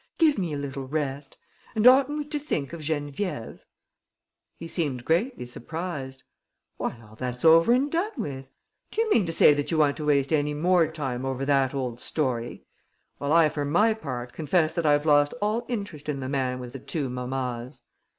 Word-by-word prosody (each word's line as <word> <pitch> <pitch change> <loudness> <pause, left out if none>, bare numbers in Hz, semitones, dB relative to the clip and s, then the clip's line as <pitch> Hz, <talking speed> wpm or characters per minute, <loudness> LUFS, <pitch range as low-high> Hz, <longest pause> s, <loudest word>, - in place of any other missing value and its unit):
Give 310 -8 +4
me 175 -4 -2
a 145 - -2
little 135 -1 -5
rest!... 140 -1 -3 0.4
And 220 +1 +1
oughtn't 270 +3 +6
we 300 - -3
to 300 -1 -2
think 160 - -3
of 170 - -6
Geneviève?" 145 - -3 1.0
He 165 - -7
seemed 140 -8 -2
greatly 185 - 0
surprised: 135 +1 -6 0.5
"Why, 115 - -3
all 105 0 -16
that's 125 +4 -4
over 165 +6 +7
and 270 +4 +2
done 365 +7 0
with! 135 - -5 0.4
Do 450 - -1
you 445 - -3
mean 205 - +3
to - - -1
say 150 -2 +6
you 165 - 0
want 145 -2 +3
to 150 - -4
waste 140 0 +2
any 150 -1 +1
more 175 +1 +3
time 135 -6 -3
over 135 0 -2
that 135 -1 +2
old 125 -3 -3
story? 125 -6 -2 0.5
Well, 140 0 -2
I 165 -1 +6
for 145 -1 -3
my 175 +10 +3
part 125 - -6
confess 160 +1 +1
that 170 -3 0
I've 145 0 +3
lost 145 -1 +4
all 215 +3 0
interest 200 - -5
in 140 -2 -2
the 130 - -4
man 130 -2 -1
with 125 -1 -8
the 135 - -6
two 145 +2 -3
mammas." 125 0 -4
150 Hz, 190 wpm, -26 LUFS, 135-175 Hz, 1.0 s, over